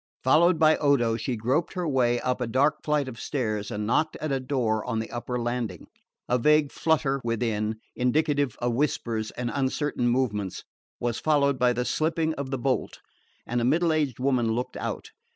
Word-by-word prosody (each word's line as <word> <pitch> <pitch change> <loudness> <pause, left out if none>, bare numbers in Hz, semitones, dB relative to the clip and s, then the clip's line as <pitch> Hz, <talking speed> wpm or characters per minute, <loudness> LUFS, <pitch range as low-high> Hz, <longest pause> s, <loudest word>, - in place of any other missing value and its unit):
Followed 165 +6 +5
by 155 0 +5
Odo 130 -6 +2
she 120 +2 -2
groped 130 +9 0
her 180 -2 -2
way 120 -4 +2
up 125 0 -1
a 125 - -1
dark 140 +6 +2
flight 150 -2 +1
of 115 -3 -8
stairs 110 -7 -2
and 105 -2 -3
knocked 125 +8 +1
at 155 -1 -4
a 135 - +1
door 125 -5 0
on 125 -2 -2
the 110 0 -4
upper 120 +1 -3
landing. 120 -6 -3 0.4
A 125 - +2
vague 150 +2 +3
flutter 140 -3 +1
within, 110 -2 -1 0.2
indicative 145 +1 +1
of 120 0 -1
whispers 115 -5 -1
and 120 -1 -4
uncertain 135 -1 0
movements, 110 -6 -1 0.4
was 120 -1 -1
followed 140 -3 +2
by 125 0 +4
the 125 0 -1
slipping 160 +2 0
of 140 -3 -5
the 135 - -2
bolt, 130 +1 -1 0.5
and 120 +1 -1
a - - 0
middle 160 +6 +2
aged 145 -6 0
woman 125 -4 +1
looked 125 +2 -3
out. - - -5
125 Hz, 185 wpm, -26 LUFS, 120-145 Hz, 0.5 s, Followed